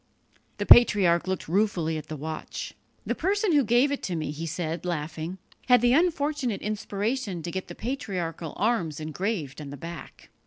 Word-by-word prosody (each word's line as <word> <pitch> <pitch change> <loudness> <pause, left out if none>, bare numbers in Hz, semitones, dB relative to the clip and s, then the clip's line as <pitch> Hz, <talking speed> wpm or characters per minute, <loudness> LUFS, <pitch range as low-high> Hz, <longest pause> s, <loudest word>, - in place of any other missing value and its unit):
The - - -2
patriarch 190 -7 +6
looked 190 -1 -2
ruefully 175 -3 +1
at 155 -1 -6
the 155 - -5
watch. 155 +2 -5 0.3
"The - - 0
person 405 +2 +1
who 290 -3 +5
gave 245 +5 +3
it 285 - -3
me," 160 -4 -2
he 160 +3 -5
said, 165 +1 -3
laughing, 165 +1 -3 0.3
"had 250 -2 +6
the 245 0 +4
unfortunate 290 - +1
inspiration 210 -2 -2
to 170 - -4
get 190 +1 -4
the - - -9
patriarchal 180 - -4
arms 190 -9 0
engraved 155 - -3
on 145 - -7
the 145 - -7
back!" 170 +3 -9
185 Hz, 165 wpm, -27 LUFS, 160-240 Hz, 0.3 s, patriarch